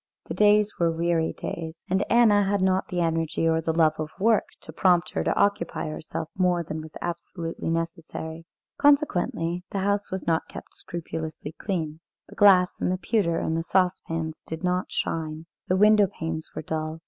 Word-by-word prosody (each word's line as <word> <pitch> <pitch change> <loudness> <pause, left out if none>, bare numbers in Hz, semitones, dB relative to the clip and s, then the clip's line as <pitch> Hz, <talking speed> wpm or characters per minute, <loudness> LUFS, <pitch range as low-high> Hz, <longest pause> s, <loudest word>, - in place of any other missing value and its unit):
The - - -5
days 210 0 +3
were 170 -1 +3
weary 165 0 0
days, 165 0 -6
and 190 +2 +1
Anna 220 -4 +5
had 200 +1 +1
not 190 0 +2
the 175 -1 -2
energy 165 -1 0
or 160 0 +2
the 160 - 0
love 160 -1 +2
of 155 -1 -3
work 220 +2 +3 0.2
to - - -11
prompt 180 -2 +3
her - - -1
to - - 0
occupy 170 -6 0
herself 155 +1 -5
more 180 -2 +2
than 155 0 -5
was 155 0 -11
absolutely 170 -1 -4
necessary. 165 0 -4 0.3
Consequently, 180 - +2
the - - -4
house 200 +1 0
was 190 0 -4
not 165 -1 +1
kept - - -10
scrupulously 160 -3 -6
clean. 160 -3 -4 0.3
The - - -12
glass 185 -3 +5
and - - +1
the 185 - 0
pewter 185 -4 0
and 160 - -1
the 165 - 0
saucepans 165 -3 -1
did 160 +2 -6
not 180 0 0
shine. 160 0 -3 0.2
The 185 - +2
window 210 0 +6
panes 160 -2 -5
were - - -4
dull. 155 +1 -3
170 Hz, 180 wpm, -26 LUFS, 160-190 Hz, 0.3 s, window